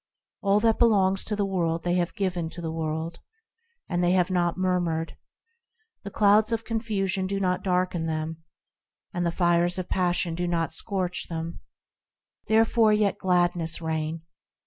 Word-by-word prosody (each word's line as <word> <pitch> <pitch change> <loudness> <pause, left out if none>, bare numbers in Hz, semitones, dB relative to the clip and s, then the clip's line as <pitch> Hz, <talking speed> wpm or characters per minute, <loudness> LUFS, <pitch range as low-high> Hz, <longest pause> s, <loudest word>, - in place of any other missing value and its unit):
All 200 +1 +3
that 225 0 +2
belongs 195 -5 +3
to 210 - -1
the 205 -1 0
world 170 -4 -1
they 175 - 0
have 175 -1 0
given 180 -5 -2
to 175 - -9
the 165 -1 -3
world, 160 +1 -3 0.7
And 175 0 -1
they 175 +1 +3
have 185 0 +2
not 175 -1 +1
murmured. 175 -3 -1 0.9
The 200 - -7
clouds 210 +2 +4
of 225 0 -1
confusion 195 -5 -1
do 195 +1 -2
not 180 -1 0
darken 180 -3 0
them, 160 0 -3 0.7
And 175 -1 0
the - - 0
fires 175 0 +2
of 185 -1 -4
passion 175 -2 0
do 175 +2 -2
not 165 -2 -1
scorch 185 0 -2
them; 165 0 -5 0.9
Therefore 220 0 +4
let 210 -2 +1
gladness 175 -3 +1
reign 160 0 -3
180 Hz, 155 wpm, -26 LUFS, 165-195 Hz, 0.9 s, clouds